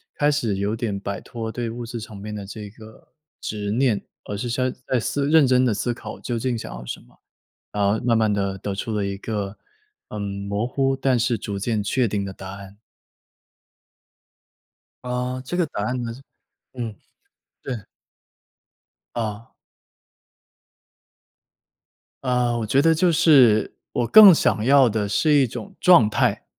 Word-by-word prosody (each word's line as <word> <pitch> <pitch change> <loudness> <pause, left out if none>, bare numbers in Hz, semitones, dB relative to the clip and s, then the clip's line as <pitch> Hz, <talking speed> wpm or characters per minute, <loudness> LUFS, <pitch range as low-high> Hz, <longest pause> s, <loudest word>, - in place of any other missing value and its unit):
开 145 - +2
始 115 -9 -1
有 100 +2 -1
点 110 -3 -3
摆 100 0 -4
脱 115 -2 -6
对 120 0 -3
物 120 +1 -6
质 115 0 -5
层 110 -1 -9
面 105 +2 -7
的 100 -1 -6
这 105 +1 -8
个 110 +1 -16 0.3
执 105 -1 -4
念， 120 -2 +2 0.3
而 105 - -5
是 120 - -3
先 130 +2 0 0.2
在 130 - +1
思 140 +6 -1
认 155 -3 +6
真 130 0 +4
地 120 - +2
思 120 +4 -1
考 120 - -9
究 120 -2 -3
竟 125 +1 -1
想 - - -7
要 - - -9
什 - - -5
么， - - -24 0.5
然 105 - -1
后 100 +2 +2
慢 115 -2 +3
慢 110 -1 +2
地 100 -1 -1
得 100 +1 -4
出 110 +3 -4
了 105 -1 0
一 100 0 -3
个， 105 -2 -4 0.5
嗯， 105 - -6 0.3
模 100 +3 -1
糊， 135 +1 0
但 130 -1 +2
是 120 0 +1
逐 100 0 -5
渐 105 0 -1
确 120 +5 +1
定 100 -1 -2
的 95 - -6
答 95 0 -9
案。 100 0 -12 2.2
啊， 125 +1 -3
这 135 +7 -5
个 175 -1 +2
答 105 - -4
案 125 +3 -2
呢 115 -1 -4 0.6
嗯， 120 -4 -5 0.7
对。 120 -7 -5 1.3
啊。 110 -1 -4 2.7
啊， 125 -2 +1
我 115 - -2
觉 130 +6 +3
得 165 +2 +4
就 170 +2 +3
是 135 -10 +5 0.2
我 120 - 0
更 210 - +10
想 105 - +1
要 135 -1 +6
的 105 -1 -1
是 150 +9 +2
一 140 -3 +4
种 200 - -8
状 175 - +6
态， 105 - 0
115 Hz, 180 characters per minute, -23 LUFS, 105-130 Hz, 2.7 s, 更